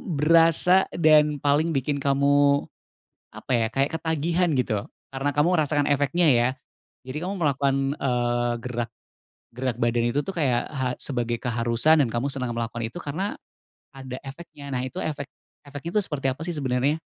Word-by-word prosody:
berasa 165 +4 +4
dan 150 -2 +4
paling 150 +3 +2
bikin 140 +2 -1
kamu, 140 +1 +3 0.7
apa - - -6
ya, 115 -1 +2
kayak 135 +3 0
ketagihan, 165 +2 0
gitu, 110 -5 -1 0.3
karena 135 +2 -1
kamu 165 +5 +3
merasakan 145 -2 +1
efeknya, 145 +5 +2
ya? 120 -1 +4 0.6
Jadi 150 +5 -5
kamu 190 +3 -3
melakukan, 140 -4 +1 0.2
eee, 120 -2 0
gerak 120 -2 -4 0.7
gerak 125 -2 -2
badan 120 0 +1
itu 140 +5 0
tuh 195 - -4
kayak 130 -7 0
ha 130 -3 -1
sebagai 120 -3 -1
keharusan 120 +6 +2
dan - - -2
kamu 120 +4 -1
senang 125 -3 -2
melakukan 115 0 -3
itu - - -18
karena 175 +7 -4 0.6
ada 130 -1 -8
efeknya. 140 0 -10
Nah, 125 - -1
itu 130 - -8
efek 145 -2 -3 0.4
efeknya 145 +3 -7
itu - - +4
seperti 140 -3 -3
apa 140 - -14
sih 175 - -2
sebenarnya? 135 +2 0
140 Hz, 160 wpm, -24 LUFS, 125-155 Hz, 0.7 s, berasa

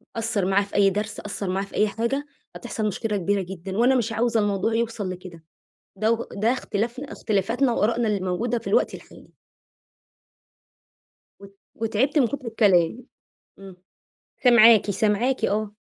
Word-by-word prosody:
قصَّر 225 -4 -1
معاه 195 +2 +2
في 200 - -12
أي 200 -1 +5
درس، 210 +2 -4
قصَّر 200 -1 -5
معاه 190 +2 -1
في - - -13
أي 210 - +3
حاجة، 235 +7 -2 0.3
هتحصل 225 -3 -3
مشكلة 210 +1 -2
كبيرة 200 +2 0
جدًا، 190 +1 -7
وأنا 250 +3 +4
مش 235 -3 0
عاوزة 230 0 +1
الموضوع 205 +1 0
يوصل 225 -4 -2
لكده. 180 -2 -9 0.5
دو 225 +3 0
ده 215 +4 +1
اختلافنا 240 +2 -4
اختلافاتنا 225 +5 0
وآرائنا 230 +1 +1
اللي 210 -2 0
موجودة 190 +7 -1
في 230 - -10
الوقت - - +2
الحالي. - - -16 2.1
وت 200 0 -15 0.2
وتعبت 230 +7 0
من 255 - +4
كتر 275 0 -6
الكلام، 210 -1 +2 0.6
امم. 195 -2 -11 0.7
سامعاكِ، 230 -4 +6
سامعاكِ 220 +5 +1
آه. 210 0 -2
215 Hz, 145 wpm, -24 LUFS, 200-235 Hz, 2.1 s, سامعاكِ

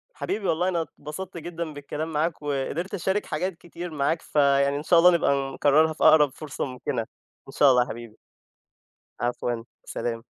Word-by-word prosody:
حبيبي 205 -2 -3
والله، 175 +3 +1
أنا 170 -2 0
اتبسطت 170 +3 -8
جدًا 165 -1 -5
بالكلام 150 +3 -5
معاك، 155 +2 -1
وقدرت 145 +6 -3
أشارك 195 +2 -1
حاجات 180 +3 -3
كتير 175 +1 -8
معاك 155 +2 0
فيعني 140 -1 +2
إن 145 - -5
شاء 170 +1 +5
الله 180 +1 +7
نبقى 140 -5 +1
نكررها 155 +2 +3
في - - -4
أقرب 155 -2 +7
فرصة 155 -3 -5
ممكنة، 125 -2 -3 0.5
إن - - -9
شاء 140 -1 +6
الله 125 - +5
يا 125 - -11
حبيبي. 115 -1 -8 1.0
عفوًا، 120 -1 -2 0.2
سلام. 115 -1 -4
150 Hz, 170 wpm, -25 LUFS, 140-170 Hz, 1.0 s, الله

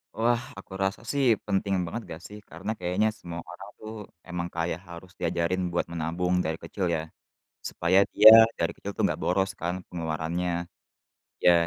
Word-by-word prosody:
Wah, 120 +1 +2 0.2
aku 100 - -14
rasa 95 0 -1
sih 140 -1 +1 0.2
penting 100 0 0
banget 115 +8 -4
nggak 80 +1 -8
sih 105 - -10
karena 95 +7 -5
kayaknya 90 +4 +1
semua 85 -1 -7
orang 95 +3 -10
tuh 110 0 -8 0.4
emang 85 -1 -3
kayak 85 0 -1
harus 85 +1 -11
diajarin 85 +2 0
buat 85 - 0
menabung 85 +2 -1
dari 80 0 -1
kecil 95 +3 -3
ya, 80 - -1 0.7
supaya 90 +3 +3
dia - - +10 0.3
dari 85 0 +1
kecil 100 - -6
tuh - - -1
nggak - - -1
boros 95 +2 +1
kan 85 +1 -1 0.2
pengeluarannya. 85 +1 -2 0.9
Ya, 90 - +8
90 Hz, 165 wpm, -27 LUFS, 85-95 Hz, 0.9 s, dia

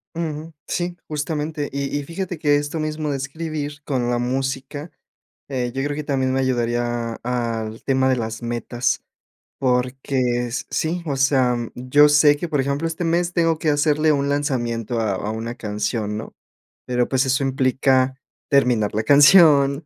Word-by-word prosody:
Uju, 160 -1 -4
sí, 175 0 -2
justamente. 150 0 -3
Y 140 +1 -2
y - - -4
fíjate 175 +3 -5
que 145 -1 +3
esto 145 +2 -2
mismo 155 -1 -2
de 140 - -1
escribir 150 +1 -5
con 125 -4 -1
la 120 - +1
música, 135 +4 -3 0.6
eh, 125 -3 -2
yo 135 - -1
creo 145 0 -2
que 150 - -4
también 130 -2 0
me 135 - +1
ayudaría 120 -2 -1
al 115 -2 -3
tema 130 -1 +2
de 130 - +2
las 115 0 -4
metas, 120 +1 -1 0.6
porque 125 -1 0
es 120 +1 -4
Sí, 170 +3 -1
o 145 -3 -2
sea, 130 -2 +3 0.2
yo 145 +4 +4
sé 145 0 +6
que, 170 +3 -4
por 150 -3 0
ejemplo, 140 +4 -1
este 165 +2 -3
mes 170 +1 +1
tengo 165 -2 +2
que 155 - 0
hacerle 150 +1 +3
un 140 -1 0
lanzamiento 120 -5 -1
a 110 -3 0
a 100 +3 -3
una 115 +2 -5
canción, 105 0 -3
¿no?, 110 - -8 0.5
pero, 125 -1 0
pues, 130 0 +2
eso 130 +1 +1
implica 130 0 +2 0.3
terminar 125 -7 +2
la 110 - 0
canción, 145 - +6
135 Hz, 165 wpm, -22 LUFS, 120-150 Hz, 0.6 s, sé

